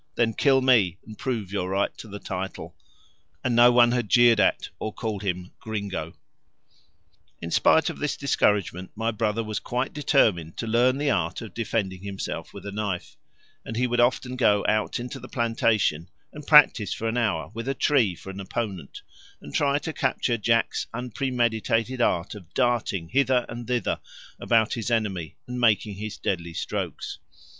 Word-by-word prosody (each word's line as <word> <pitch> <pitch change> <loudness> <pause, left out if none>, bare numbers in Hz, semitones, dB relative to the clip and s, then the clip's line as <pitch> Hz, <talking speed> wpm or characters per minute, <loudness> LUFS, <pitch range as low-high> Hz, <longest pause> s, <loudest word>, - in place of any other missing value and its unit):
then 115 -1 +2
kill 135 +1 +3
me 110 -9 +4
and 110 -1 -11
prove 110 -8 -3
your 95 -2 -2
right 100 +1 0
to - - -10
the 100 -1 -7
title," 95 -1 -6 0.7
and 125 -2 +1
no 120 +1 +7
one 120 -1 +5
had 120 -4 -1
jeered 120 -3 +6
at 95 - +2
or 110 - -3
called 110 -2 -4
him 90 -2 -3
"gringo." 100 -7 -4 1.2
In 85 - -6
spite 160 - +4
of - - -4
this 150 - -2
discouragement 100 -9 +1
my 115 +1 -1
brother 110 0 -1
was 110 -1 -3
quite 125 +2 -3
determined 105 - +2
to - - -3
learn 120 +3 +3
the 145 0 +1
art - - -1
of 110 - -10
defending 105 -5 -2
himself 100 -1 -5
with - - -11
a 100 - -5
knife, 100 -3 -4 0.5
and 115 - -6
he 125 - +2
would 120 0 0
often 125 +1 +2
go 105 -5 +3
out 110 +3 +1
into 120 0 -6
the - - -11
plantation 115 - +1 0.2
and 150 -1 -10
practise 145 - +6
for 115 - -3
an 115 - -1
hour 105 -9 0
with 115 +2 -6
a 135 - -1
tree 125 - +2
for 95 - -9
an 95 - -9
opponent, 100 - -5 0.4
and 75 - -11
try 140 0 +2
to 155 +2 -4
capture 120 - 0
Jack's 115 +1 +1
unpremeditated 120 -1 -1
art 85 -5 +1
of 95 -5 -12
darting 120 -9 0
hither 130 -1 +2
and 120 +1 -7
thither 125 -1 -1 0.4
about 115 -1 +2
his 115 -1 -3
enemy 100 -8 -1
and 125 0 -4
making 110 -2 +3
his 110 +1 -6
deadly 85 -3 -3
strokes. - - -4
115 Hz, 175 wpm, -25 LUFS, 100-125 Hz, 1.2 s, no